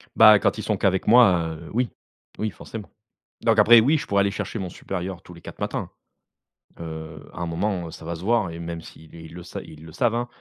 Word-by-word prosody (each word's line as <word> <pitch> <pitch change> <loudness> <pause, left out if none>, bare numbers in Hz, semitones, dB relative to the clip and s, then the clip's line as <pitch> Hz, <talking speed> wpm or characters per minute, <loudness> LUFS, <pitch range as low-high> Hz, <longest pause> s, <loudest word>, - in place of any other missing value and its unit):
Bah, - - +8
quand - - +1
ils - - -5
sont - - 0
qu'avec 95 -1 +1
moi, 90 -9 +5
heu, 80 - -11
oui, 125 0 +1 0.5
oui 110 - -1
forcément. 105 -1 -9 0.5
Donc 115 -1 +3
après, 115 +2 +8
oui, 140 +8 +3
je - - -5
pourrais 100 0 +2
aller 100 0 +1
chercher 105 +2 -4
mon 95 -2 -4
supérieur 90 0 -5
tous 90 - -13
les 85 - -14
4 - - -11
matins. - - -3 0.9
Heu, 80 -1 -8
à - - -7
un - - -1
moment, 85 +1 -2
heu, - - -9
ça 80 - -11
va 85 - -4
se 80 - -10
voir 105 -3 +1
et 85 - -8
même 85 -1 -5
si 80 0 -14
les 80 +1 -13
ils 80 - -12
le 85 0 -9
sa 85 - -7
ils 75 0 -13
le 80 - -11
savent 115 +7 +1
hein. 120 +1 -1
90 Hz, 250 wpm, -24 LUFS, 85-110 Hz, 0.9 s, Bah